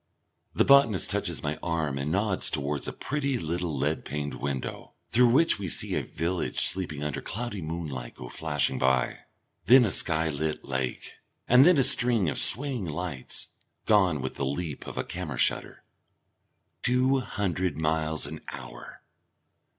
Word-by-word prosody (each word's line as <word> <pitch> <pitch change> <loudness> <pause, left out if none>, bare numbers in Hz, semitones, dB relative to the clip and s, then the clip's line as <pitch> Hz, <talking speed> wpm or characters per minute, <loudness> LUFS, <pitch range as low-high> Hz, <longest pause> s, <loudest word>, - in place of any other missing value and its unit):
The - - +3
botanist 140 -8 +5
touches - - -2
my 75 +1 -3
arm 80 -5 -2
and 70 +3 -3
nods 100 0 +2
towards 70 -1 -2
a - - -3
pretty 140 -2 -2
little 85 -3 -3
lead 75 +4 -1
paned 75 0 -4
window, 70 -2 -5 0.2
through 125 +1 +5
which 140 +2 +3
we 100 - -4
see - - -1
a - - 0
village 85 +3 -3
sleeping 90 -6 +2
under 75 -2 -3
cloudy 110 -1 -4
moonlight 80 -7 -6
go 60 - -9
flashing 75 -4 -1
by. 65 0 +1 0.5
Then 125 +2 +7
a 100 - -1
skylit 80 -1 0
lake, 65 -1 -4 0.3
and 125 +5 +7
then 180 -3 +5
a 135 - +4
string 120 - +3
of - - +3
swaying 130 -3 +5
lights, 80 -4 -5 0.4
gone 95 -9 +3
with 65 - -5
the - - -2
leap 75 +1 -5
of - - -8
a - - -1
camera 80 -8 -6
shutter. - - -1 1.0
Two 130 +2 +2
hundred 95 - -2
miles 80 -1 -1
an 75 +2 -8
hour! - - -10
85 Hz, 155 wpm, -27 LUFS, 75-110 Hz, 1.0 s, Then